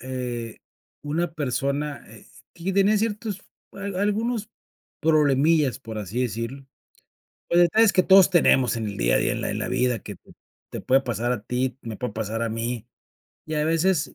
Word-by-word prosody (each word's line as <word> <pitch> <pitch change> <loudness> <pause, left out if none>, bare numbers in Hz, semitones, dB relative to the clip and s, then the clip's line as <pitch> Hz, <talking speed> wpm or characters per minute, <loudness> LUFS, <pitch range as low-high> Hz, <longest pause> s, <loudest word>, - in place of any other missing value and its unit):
Eh, 120 -3 -5 0.4
una 160 +3 -2
persona, 140 0 -2
eh, - - -15 0.3
que 175 +3 -3
tenía 200 +2 +3
ciertos 210 -2 -3 0.3
a - - -13 0.2
algunos 215 +1 -1 0.5
problemillas 150 -2 +3
por 110 -3 -7
así 105 +5 -4
decirlo. 120 +4 -4 0.8
Los 175 - +5
detalles 215 +5 +5
que 185 - +4
todos 190 0 +6
tenemos 130 -9 +4
en 110 - -3
el 100 -1 -5
día - - +2
a - - +4
día, - - +1
en - - -3
la - - -2
en - - -3
la - - -3
vida 125 -2 +1
que 100 - -9 0.5
te - - -5
puede 135 +1 +3
pasar 120 -1 -2
a 110 -4 -4
ti, 125 +2 -2
me 115 -3 -6
puede 125 -2 -4
pasar 110 +1 -3
a 115 - 0
mí. 115 +1 -3 0.6
Y 155 - -4
a 150 - +1
veces, 165 +1 +1
135 Hz, 180 wpm, -24 LUFS, 115-175 Hz, 0.8 s, todos